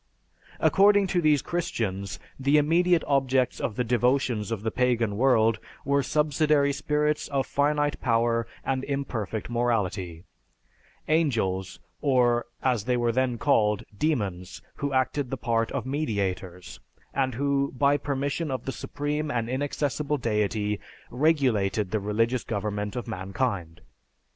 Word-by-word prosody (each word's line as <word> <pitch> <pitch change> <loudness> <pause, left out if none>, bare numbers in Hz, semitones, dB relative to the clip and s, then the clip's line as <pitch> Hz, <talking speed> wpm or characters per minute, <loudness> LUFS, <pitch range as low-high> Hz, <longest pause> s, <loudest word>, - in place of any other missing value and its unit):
"According 205 0 +5
to 175 - +2
these 150 -3 +3
Christians, 100 - -3 0.2
the 140 +3 +3
immediate 170 +3 +3
objects 130 -2 +1
of 110 - -2
the 125 - 0
devotions 120 -2 +1
of 110 -3 -3
the 110 - -1
pagan 120 -4 +1
world 115 -2 +3 0.3
were 140 +1 +2
subsidiary 150 0 +2
spirits 150 +1 0
of 140 -2 -1
finite 145 0 0
power 115 -1 +1 0.2
and 130 -1 -1
imperfect 120 -7 -3
morality; 100 -8 -1 0.8
angels, 110 - 0 0.2
or, 120 -4 +2 0.2
as 125 -6 +1
they 125 -1 +1
were 120 -1 +1
then 125 0 0
called, 105 -2 +2
demons, 95 - -2 0.2
who 140 0 -2
acted 130 0 0
the 135 - -3
part 115 -1 0
of - - -3
mediators, 100 - -3 0.3
and 130 -3 0
who, 140 +1 0
by 140 +2 +4
permission 140 +2 -2
of 130 -3 -3
the 135 - -2
Supreme 150 +3 -3
and 115 -5 -1
Inaccessible 145 +2 -1
Deity, 105 -3 -1 0.3
regulated 120 - +1
the 110 - +1
religious 115 +4 0
government 105 -1 -3
of 125 - -4
mankind. 95 -4 -3
125 Hz, 130 wpm, -26 LUFS, 110-140 Hz, 0.8 s, According